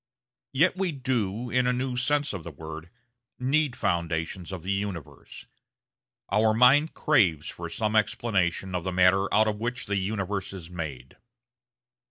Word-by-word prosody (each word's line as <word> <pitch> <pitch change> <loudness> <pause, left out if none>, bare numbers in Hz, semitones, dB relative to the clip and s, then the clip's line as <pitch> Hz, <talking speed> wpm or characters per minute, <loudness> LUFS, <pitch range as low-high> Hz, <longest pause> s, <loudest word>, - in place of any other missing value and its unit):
Yet 165 +8 +3
we 190 -2 -1
do, 120 -4 -2
in 125 0 +2
a 125 - +2
new 125 0 -2
sense 145 +2 +1
of 95 -4 -5
the 85 - -6
word, 80 +2 -9 0.5
need 135 +1 +1
foundations 85 +1 -2
of 95 -4 -6
the 95 - -2
universe. 100 -6 -5 0.9
Our 110 0 +3
mind 135 +7 +5
craves 90 - +2
for 85 -1 -7
some 110 +5 -1
explanation 95 -4 0
of 90 -2 -2
the 95 - -2
matter 95 +2 +3
out 110 +1 +4
of 105 -1 -1
which 120 +3 -3
the 100 - -1
universe 100 0 -2
is 90 -3 -9
made. 75 -7 -7
100 Hz, 155 wpm, -27 LUFS, 90-125 Hz, 0.9 s, mind